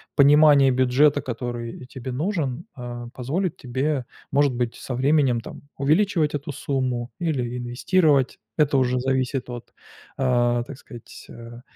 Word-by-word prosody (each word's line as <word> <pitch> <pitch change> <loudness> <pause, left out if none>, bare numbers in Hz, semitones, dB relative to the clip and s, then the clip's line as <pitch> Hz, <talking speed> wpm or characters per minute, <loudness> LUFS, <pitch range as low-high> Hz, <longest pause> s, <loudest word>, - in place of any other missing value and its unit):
понимание 145 -1 +6
бюджета, 130 +3 +3
который 120 -1 -5
тебе 130 -1 -7
нужен, 155 -1 -2
а, 120 -2 -7
позволит 160 +8 -2
тебе, 130 +2 -2 0.3
может 140 -1 +3
быть, 120 -1 -2
со 125 - -6
временем 135 -2 +2
там - - -10 0.2
увеличивать 155 +1 +2
эту 145 +1 -4
сумму 130 -3 -2
или 125 -8 -2
инвестировать. 135 +3 +1 0.2
Это 145 -2 +3
уже 125 -1 +1
зависит 130 0 -1
от, 120 -1 -8 0.4
а, 120 -2 +2
так 130 +2 -10
сказать, 120 -4 -12
э, 120 +1 -11
130 Hz, 135 wpm, -23 LUFS, 120-145 Hz, 0.4 s, понимание